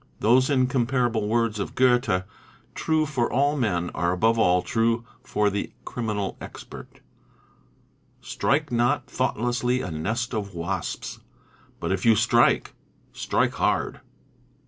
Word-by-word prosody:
Those 125 +5 +4
in 130 -3 +3
comparable 120 -4 0
words 115 -1 0
of 100 - -4
Goethe, 120 -7 +3 0.5
true 155 -1 +1
for 130 -5 -1
all 145 +3 +2
men, 90 - -1
are 85 +2 0
above 110 +5 +2
all 90 -4 +3
true 115 +1 0 0.2
for 105 -1 +1
the 100 +1 -4
criminal 105 -5 -3
expert, - - -11 1.2
"Strike 150 0 -1
not 120 +4 +1
thoughtlessly 125 0 -1
a 90 - -5
nest 110 +11 -2
of 100 -4 -4
wasps, 85 +3 -4 0.6
But 85 - -2
if 95 -1 -1
you 115 -1 +5
strike, - - +3 0.4
strike - - 0
hard." - - 0
115 Hz, 125 wpm, -25 LUFS, 100-125 Hz, 1.2 s, you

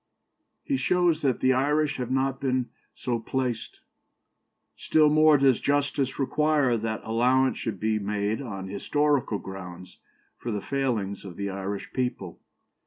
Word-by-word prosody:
" - - -50 0.2
He 275 - 0
shows 175 -7 +2
that 135 -4 0
the 130 0 +4
Irish 145 +3 +1
have 125 -2 -3
not 135 +1 0
been 130 -2 0 0.3
so 120 -2 -2
placed. 120 0 -3 0.9
"Still 155 -1 +3
more 155 0 +6
does 135 -3 +4
justice 145 -2 0
require 145 -2 +2
that 110 -1 -3
allowance 125 +4 +2
should 110 -5 -4
be 110 0 0
made 105 +3 -1
on 100 -7 -6
historical 135 +4 0
grounds 90 -2 -9 0.4
for 120 - -5
the 105 - -1
failings 110 -6 -2
of 95 -4 -9
the 100 +1 -3
Irish 100 +1 -5
people. 125 -9 -3
125 Hz, 145 wpm, -26 LUFS, 105-140 Hz, 0.9 s, more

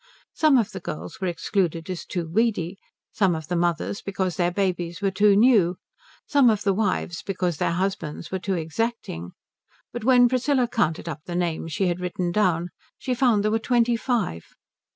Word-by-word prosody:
Some 305 -4 +4
of 225 -5 +1
the 190 - -6
girls 185 +5 -7
were 190 - 0
excluded 175 -2 -1
as 185 -2 -5
too 175 -3 -3
weedy; 195 -1 0 0.3
some 190 -5 +2
of 160 0 -7
the 180 - 0
mothers 175 +3 -1
because 190 -2 -2
their 175 -2 +1
babies 180 -2 -2
were 200 -1 0
too 205 +1 +4
new; 205 -6 +4 0.5
some 280 -4 +4
of 210 -2 +1
the 200 -1 +2
wives 185 -4 -1
because 180 -4 -2
their 170 - 0
husbands 180 -4 -3
were 190 - -2
too 190 +2 -2
exacting; 165 - -3 0.6
but 240 - -5
when 245 0 +6
Priscilla 255 +1 +1
counted 170 -8 -1
up 155 -2 -6
the 175 - -5
names 170 -2 -2
she 195 - 0
had 175 0 0
written 180 -1 -2
down 175 -3 +1 0.3
she 255 - -2
found 240 -5 +3
there 215 - +1
were 225 - +2
twenty 240 0 +2
five. 225 - -1
190 Hz, 185 wpm, -24 LUFS, 175-225 Hz, 0.6 s, when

